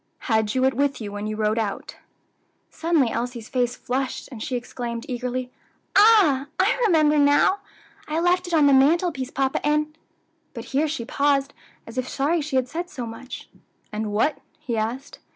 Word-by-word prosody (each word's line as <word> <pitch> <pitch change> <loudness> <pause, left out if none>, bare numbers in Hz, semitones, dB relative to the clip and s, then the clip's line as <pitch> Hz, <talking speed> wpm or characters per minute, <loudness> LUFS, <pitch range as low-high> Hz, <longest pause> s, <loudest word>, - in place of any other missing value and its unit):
Had 220 -1 +1
you 260 0 +3
it 265 - +3
with 280 +2 0
you 210 -3 -6
when 205 +1 -4
you 215 - -3
rode 215 +1 0
out?" 205 -3 -4 0.7
Suddenly 320 -8 +1
Elsie's 235 -1 -4
face 245 -2 0
flushed, 260 +1 -3
and 235 -4 -8
she 255 - -3
exclaimed 240 -1 -5
Eagerly, 250 0 -3 0.4
"Ah! 390 -11 +6
I - - +3
remember 305 -5 +4
now! 290 +7 +4 0.5
I 310 +2 -1
left 355 +1 +2
it 350 - -5
on 305 -2 +5
the 280 - +5
mantelpiece, 280 0 +3
papa, 270 0 -1
and 300 +1 0 0.3
" - - -44
But - - -6
here 295 +4 +2
she 290 -6 -4
paused, 280 +1 +1 0.3
as 230 +3 -5
if 255 - -3
sorry 310 +5 0
she 295 -2 -4
had 260 -1 +2
said 345 +6 -5
so 255 -5 -6
much. 230 +3 -9 0.4
"And 210 0 -3
what?" 225 +8 +1 0.2
he 265 -6 -3
asked. 235 +6 -4
265 Hz, 180 wpm, -24 LUFS, 235-300 Hz, 0.7 s, Ah